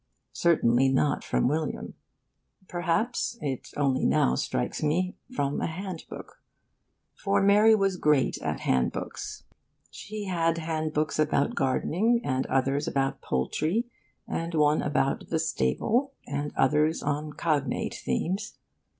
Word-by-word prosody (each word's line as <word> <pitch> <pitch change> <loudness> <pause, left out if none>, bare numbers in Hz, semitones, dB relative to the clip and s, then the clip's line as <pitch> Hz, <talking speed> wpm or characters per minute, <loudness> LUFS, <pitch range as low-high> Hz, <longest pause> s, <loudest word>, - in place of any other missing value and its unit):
Certainly 135 -6 +3
not 135 +2 +1
from - - +1
William. 155 +3 -2 0.7
Perhaps 195 +8 -1
(it 135 - -4
only 135 -3 +1
now 65 - +3
strikes 60 -1 -2
me) 175 +5 0 0.2
from 145 - -1
a - - 0
handbook. 180 +1 -7 0.7
For 200 0 0
Mary 205 +3 +6
was 195 -3 +1
great 150 -5 +2
at - - -3
handbooks. 65 -1 -2 0.5
She 215 0 -7
had 165 -3 0
handbooks 155 -2 -1
about 150 -2 +2
gardening, 180 - +1
and 130 -1 -1
others 135 +2 +1
about 135 -1 -1
poultry, 155 - 0 0.4
and 165 0 -3
one 150 0 +3
about 140 -2 0
'the 165 - +1
stable,' 165 - 0
and 145 +1 -3
others 150 +4 +2
on 150 +1 -2
cognate 145 -6 -1
themes. 185 - -2
155 Hz, 120 wpm, -27 LUFS, 140-185 Hz, 0.7 s, Mary